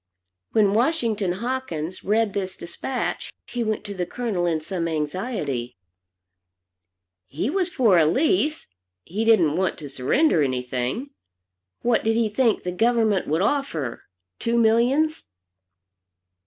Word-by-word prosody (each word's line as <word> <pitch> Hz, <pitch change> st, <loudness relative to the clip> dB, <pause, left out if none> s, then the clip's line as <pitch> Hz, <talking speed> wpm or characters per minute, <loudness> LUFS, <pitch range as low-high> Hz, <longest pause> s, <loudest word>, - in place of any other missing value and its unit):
When 205 Hz, -3 st, +4 dB
Washington 225 Hz, -, +1 dB
Hawkins 190 Hz, -7 st, -4 dB
read 215 Hz, 0 st, +1 dB
this 190 Hz, -2 st, -3 dB
despatch, 245 Hz, +9 st, -4 dB
he 240 Hz, -1 st, -3 dB
went 215 Hz, -2 st, -2 dB
to 205 Hz, -1 st, -6 dB
the 180 Hz, -3 st, -3 dB
Colonel 205 Hz, -6 st, -2 dB
in 160 Hz, -2 st, +1 dB
some 170 Hz, +1 st, -3 dB
anxiety. 150 Hz, -, -3 dB, 1.5 s
He 175 Hz, -, -2 dB
was 370 Hz, 0 st, 0 dB
for 230 Hz, -, +4 dB
a 155 Hz, -, +4 dB
lease, 310 Hz, -, +1 dB, 0.4 s
he 205 Hz, -, -3 dB
didn't 180 Hz, -10 st, +4 dB
want 190 Hz, -1 st, 0 dB
to 145 Hz, -3 st, -8 dB
surrender 155 Hz, -, +2 dB
anything. 130 Hz, -, -2 dB, 0.7 s
What 235 Hz, -1 st, +2 dB
did 225 Hz, 0 st, +2 dB
he 230 Hz, -1 st, +2 dB
think 230 Hz, +1 st, +1 dB
the 180 Hz, -, -2 dB
government 220 Hz, 0 st, +2 dB
would 160 Hz, +5 st, +1 dB
offer? 200 Hz, -, -1 dB, 0.3 s
Two 235 Hz, 0 st, 0 dB
millions? 245 Hz, +8 st, +2 dB
210 Hz, 130 wpm, -24 LUFS, 165-240 Hz, 1.5 s, When